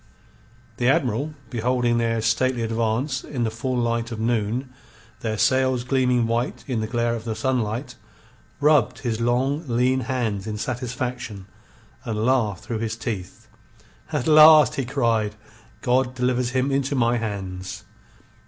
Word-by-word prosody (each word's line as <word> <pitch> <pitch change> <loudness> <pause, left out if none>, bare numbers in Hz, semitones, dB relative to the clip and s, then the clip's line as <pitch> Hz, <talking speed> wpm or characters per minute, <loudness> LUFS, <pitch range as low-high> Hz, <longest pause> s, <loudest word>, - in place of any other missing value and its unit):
The 120 - +1
Admiral, 140 +1 0 0.2
beholding 120 0 +1
their 115 -1 0
stately 120 +2 +1
advance 115 +4 -1
in 125 -5 -3
the 110 - 0
full 125 +3 -3
light 115 0 -1
of 115 - -5
noon, 120 +3 -1 0.5
their 110 -1 -2
sails 130 +1 +2
gleaming 125 -2 +2
white 115 +3 -2
in 125 -5 -2
the 110 - -2
glare 120 0 0
of 115 -2 -4
the 115 -2 -3
sunlight, 120 0 -1 0.7
rubbed 145 -5 +3
his 115 -2 -2
long, 130 +6 +1
lean 125 +2 +2
hands 115 -6 -2
in 105 -1 -3
satisfaction, 125 -3 -4 0.6
and 110 -1 -2
laughed 115 -8 +1
through 115 -2 -4
his 115 0 -2
teeth. 105 -6 -6 0.6
"At 120 - -1
last!" 155 -1 +8
he 135 - -2
cried. 115 -5 0 0.5
"God 130 0 +1
delivers 125 0 0
him 130 +2 0
into 135 +1 0
my 120 -1 +2
hands!" 95 -3 -5
120 Hz, 145 wpm, -23 LUFS, 110-130 Hz, 0.7 s, last